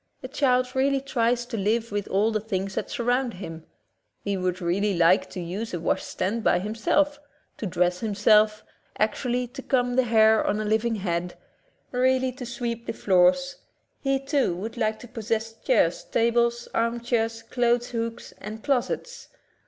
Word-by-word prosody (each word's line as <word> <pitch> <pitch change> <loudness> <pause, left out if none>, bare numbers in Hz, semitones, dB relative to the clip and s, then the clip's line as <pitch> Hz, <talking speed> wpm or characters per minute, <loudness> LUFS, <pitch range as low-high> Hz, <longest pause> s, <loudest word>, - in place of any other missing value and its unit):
The 255 - -6
child 255 -2 +1
really 275 +1 +2
tries 240 -3 0
to 240 -2 -5
live 220 +3 0
with 205 -1 -2
all 205 +4 +2
the 215 - 0
things 195 -2 -3
that - - -3
surround 245 0 0
him. 165 -4 -8 0.6
He 200 -1 -1
would 185 -1 -1
really 190 +2 0
like 170 +2 +4
to 185 - -7
use 185 +4 -4
a - - -3
washstand 190 +6 -1
by - - +4
himself, 230 +9 0 0.4
to 215 - -3
dress 180 0 +1
himself, 215 0 +3 0.3
actually 245 +3 0
to 270 +2 -8
comb 245 -2 +1
the 260 - +4
hair 220 -1 +5
on 210 - 0
a 215 - -2
living 220 +2 +1
head, 180 -3 -3 0.5
really 260 +1 +2
to 250 -1 -8
sweep 235 -1 -4
the - - -2
floors; 195 +9 +3 0.4
he. 270 -1 +1
too, 275 - 0
would 215 +6 -6
like 220 -2 0
to 245 - -10
possess 225 0 -3
chairs, - - +1
tables, 235 - +1
arm 230 +1 0
chairs, 230 -1 -1
clothes 240 -1 +1
hooks 230 -1 -4
and 215 +1 -8
closets. 280 - -2
230 Hz, 165 wpm, -25 LUFS, 205-245 Hz, 0.6 s, hair